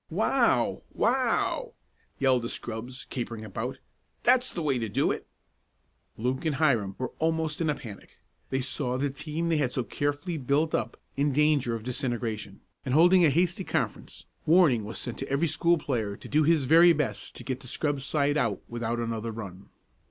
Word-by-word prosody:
"Wow! - - +2
Wow!" 265 - +1 0.4
yelled 130 -2 +3
the 115 - -4
scrubs, 120 +3 -5
capering 115 -3 -4
about. 115 +6 -4 0.5
"That's 250 +1 +4
the 170 - -4
way 135 -4 +1
to 115 -2 -3
do - - +1
it!" - - -5 0.9
Luke 125 +3 -1
and 155 -3 0
Hiram 120 -10 +2
were 130 -1 -3
almost 160 -1 0
in 160 - +1
a 150 - +1
panic. 105 -7 -11 0.3
They 130 0 0
saw 125 -1 -1
the 140 +1 -1
team 155 +4 -3
they 165 - +2
had 135 -4 +1
so 130 - -1
carefully 145 +6 -2
built 145 +4 +1
up - - -1 0.2
in 145 +1 +1
danger 145 -5 +2
of 110 - -6
disintegration; 120 -5 -3 0.2
and 130 0 -1
holding 175 +3 +6
a 160 - +6
hasty 175 +5 +1
conference, - - -3 0.2
warning 155 - +5
was 110 - -6
sent 120 - -4
to 135 - -5
every 140 +5 +1
school 170 +2 +2
player 110 -9 -2
to - - -11
do 155 - +2
his 155 -2 +3
very 165 +5 +7
best 150 -1 -3
to - - -7
get 130 -1 -3
the 130 - -11
scrub 145 +2 -1
side 145 +1 +1
out 115 -9 0
without 120 0 -3
another 115 -1 -3
run. 100 -4 -8
135 Hz, 180 wpm, -28 LUFS, 120-155 Hz, 0.9 s, very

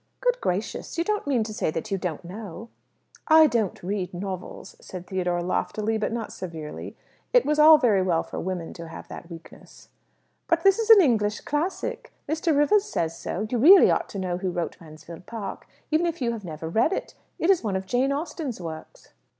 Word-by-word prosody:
"Good - - 0
gracious! 195 - -3
You 335 - +2
don't 420 -3 -2
mean 255 -5 +2
to 215 0 -6
say 210 - -1
that 165 +7 -4
you 195 - +1
don't 175 -2 -4
know?" 205 +3 -8 0.6
"I 315 0 +8
don't 225 - -1
read 185 -1 -3
novels," 185 0 -6
said 180 -1 -8
Theodore 180 -2 -1
loftily, 215 +4 -1
but 215 - -1
not 230 -1 -4
severely. 160 -5 -7 0.4
It - - +5
was 300 +1 +1
all 310 +1 +9
very 225 -9 +3
well 175 -3 +1
for - - -7
women 180 -2 -4
to 170 -1 -9
have 160 - -10
that 170 - -9
weakness. 165 -1 -13 0.6
"But - - +1
this 390 +2 +5
is 455 0 -1
an 440 -3 +10
English 215 - +1
classic! 375 +10 -3 0.2
Mr. 315 0 +1
Rivers 395 +8 +4
says 165 - -2
so. 200 +5 -4
You 245 - 0
really 365 - +8
ought - - 0
to - - -7
know 180 -2 -2
who 185 -1 -2
wrote 175 -2 -3
'Mansfield 160 +2 -12
Park,' 225 -3 -6 0.2
even 320 +3 +2
if 335 0 -3
you 240 -3 0
have 225 -3 -6
never 160 -2 -6
read 220 - +2
it. - - -4 0.2
It 345 - +3
is 370 - +2
one 205 -4 -1
of 190 0 -2
Jane 250 +7 +1
Austen's 285 - -4
works." 160 -3 -9
215 Hz, 200 wpm, -25 LUFS, -, 0.6 s, an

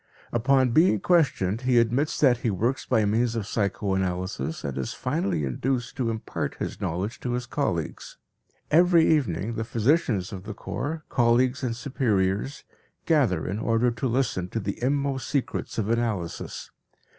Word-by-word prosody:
Upon 130 +2 +3
being 155 - +4
questioned 125 - +2
he 125 -1 +2
admits 120 +6 +2
that 130 -5 +5
he 120 - -1
works 115 +7 -1
by 115 -4 +3
means 115 +3 +1
of 110 -3 -2
psychoanalysis 95 - -2
and 70 -3 -3
is 65 -2 -3
finally 85 -4 -1
induced 120 - -2
to 125 -4 0
impart 110 -1 -3
his - - -5
knowledge 95 +9 -3
to 125 - -3
his 125 0 -2
colleagues. - - -3 0.5
Every 170 0 +5
evening 115 - +1
the 110 - -2
physicians 115 - +1
of 95 0 -7
the 110 - -6
corps, 155 +8 -4
colleagues 125 +2 +2
and 120 -3 -1
superiors, 115 -2 -1 0.4
gather 125 - +2
in 100 +4 -3
order 115 +2 +2
to 120 +3 -2
listen 115 -7 0
to 115 - -2
the 100 +1 -4
inmost 140 +1 0
secrets 140 -3 -2
of 110 -3 0
analysis. 110 -7 -2
115 Hz, 155 wpm, -26 LUFS, 100-130 Hz, 0.5 s, that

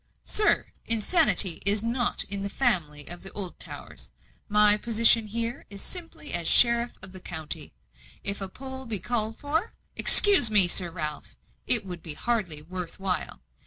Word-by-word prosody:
"Sir, 420 0 -1
insanity 230 - +3
is 205 +2 +2
not 240 +1 -2
in 200 0 -4
the 200 - -6
family 165 - -3
of 175 0 -4
the 195 - -8
Oldtowers. 190 -4 -10 0.4
My 210 0 +2
position 225 0 +2
here 230 +2 -6
is 200 -1 -9
simply 335 -4 -9
as 170 -2 -2
sheriff 235 +3 +3
of 190 - -7
the 185 - -12
county. 160 - -9 0.5
If 200 0 -3
a 195 - -7
poll 265 +3 -12
be 220 -2 +1
called 220 +3 -5
for 305 +4 -5
" - - -45
"Excuse 395 - +8
me, 205 -4 +9
Sir 175 0 -2
Ralph, 155 -3 -9 0.3
it 235 -4 +3
would 180 -3 -10
be 155 -2 -1
hardly 190 -11 -4
worth 180 +2 -10
while. 185 - -6
205 Hz, 160 wpm, -24 LUFS, 180-235 Hz, 0.5 s, me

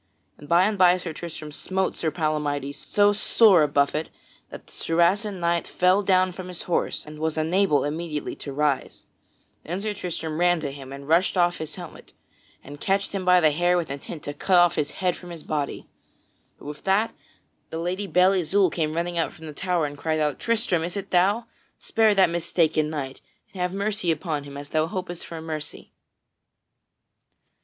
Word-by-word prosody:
Then 145 - -13
by 170 +3 +5
and 210 -1 -1
by 180 -1 +6
Sir 170 -3 -5
Tristram 155 -2 -7
smote 190 +5 -2
Sir 160 - -1
Palamydes 150 -3 -1
so 205 +6 +2
sore 205 -3 +5
a 150 - +4
buffet 145 +2 +1 0.4
that - - -10
the - - -19
Saracen 185 +4 +1
knight 170 0 0
fell 185 +3 +3
down 185 -1 +3
from 185 0 -8
his 180 -2 -5
horse 175 - -1
and 150 0 -10
was 160 0 -1
unable 160 0 +2
immediately 150 0 -3
to - - -7
arise. 145 -1 -1 0.6
Then 175 +4 -4
Sir 210 +1 -2
Tristram 165 -5 -4
ran 175 -1 +3
to 145 -2 -3
him 135 -1 -10
and 140 0 -9
rushed 170 +4 +3
off 175 0 +2
his 160 -1 -5
helmet 175 -3 -11 0.5
and 145 +1 -11
catched 195 +1 +1
him 195 -2 -3
by 180 0 +6
the 155 -3 +4
hair 175 +4 +2
with 170 -5 -2
intent 145 +2 -7
to 145 - -4
cut 175 +2 +4
his 145 -1 -1 0.2
head 180 - +3
from 180 - -11
off - - -7
his 165 - -10
body. 150 -2 -3 0.7
But - - -16
with 150 0 -8
that 200 +4 +2 0.6
the 160 - -5
Lady 180 +4 -2
Belle 185 +1 +4
Isoult 190 0 +2
came 155 -2 -1
running 170 +1 -2
from 165 - +3
out - - -7
the 160 -1 -9
tower 180 0 0
and 145 0 -5
cried 155 +2 -1
out: 150 -2 0
"Tristram, 225 -8 +1
is 175 +4 -3
it 200 0 -6
thou? 200 +6 +3 0.3
Spare 220 -2 +2
that 190 -1 +6
mistaken 165 -2 +1
knight 135 -4 -5 0.3
and 185 - -6
have 180 0 0
mercy 200 -1 -1
upon 155 -3 -1
him 140 0 -9
as 145 0 -8
thou 155 0 +1
hopest 180 -1 -5
for 165 - -7
mercy." 155 -1 -6
170 Hz, 195 wpm, -25 LUFS, 155-185 Hz, 0.7 s, by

